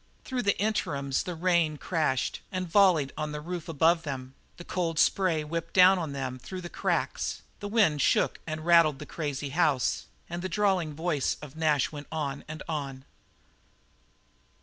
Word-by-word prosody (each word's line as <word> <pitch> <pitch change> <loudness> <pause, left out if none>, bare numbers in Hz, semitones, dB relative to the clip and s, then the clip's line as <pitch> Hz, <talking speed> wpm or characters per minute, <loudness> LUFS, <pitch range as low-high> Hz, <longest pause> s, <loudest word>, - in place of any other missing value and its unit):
Through 255 -2 -2
the 200 -3 +1
interims 140 -10 0
the 180 - -5
rain 170 -3 +2
crashed 155 -6 -1
and 185 -1 -2
volleyed 170 -6 +4
on 150 0 -3
the 150 - -4
roof 170 +1 -6
above 165 +2 +3
them; 135 -4 -6 0.2
the 175 - -9
cold 170 -3 -2
spray 170 -3 +3
whipped 165 +2 -5
down 185 0 +7
on 160 -4 -3
them 130 -2 -4
through 185 +9 -7
the 175 - -7
cracks; - - -1 0.2
the 205 - -5
wind 205 -9 +3
shook - - +2
and 155 0 -4
rattled 170 -4 +5
the - - -8
crazy 145 -3 -4
house; 140 -4 +1 0.2
and 175 +1 -5
the 185 - -3
drawling 185 -6 +1
voice 160 -3 0
of 150 -2 -10
Nash 155 -4 +2
went 145 -1 -8
on 145 -3 -3
and 155 +1 -7
on. 140 -4 -4
160 Hz, 170 wpm, -28 LUFS, 145-180 Hz, 0.2 s, down